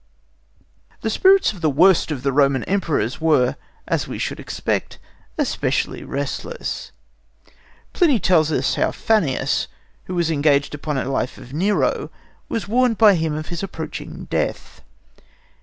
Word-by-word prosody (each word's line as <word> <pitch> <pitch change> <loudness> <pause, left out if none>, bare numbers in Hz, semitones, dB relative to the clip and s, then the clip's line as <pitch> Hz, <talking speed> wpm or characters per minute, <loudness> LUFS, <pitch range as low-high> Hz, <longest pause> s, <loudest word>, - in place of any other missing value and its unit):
The - - -1
spirits 385 - +4
of 185 - -12
the 160 - +2
worst 175 +6 +4
of 140 -5 -4
the 135 - +1
Roman 140 -2 +3
Emperors 160 - -1
were, 150 -6 +3 0.3
as - - -1
we - - -5
should - - -3
expect, - - -3 0.4
especially - - -1
restless. 145 - -4 1.0
Pliny 305 - +3
tells 165 -4 +3
us 135 -2 +1
how - - +1
Fannius, 195 - 0 0.4
who 185 - -5
was 170 -2 +1
engaged 145 -2 +2
upon 145 0 -3
a - - -2
Life 135 -1 -2
of 125 - -12
Nero, 195 +7 0 0.4
was 220 -5 -3
warned 240 +1 +2
by 215 -3 +7
him 160 -3 -1
of 155 0 -5
his 170 -1 -4
approaching 170 -5 -6
death. - - -3
160 Hz, 140 wpm, -21 LUFS, 140-200 Hz, 1.0 s, by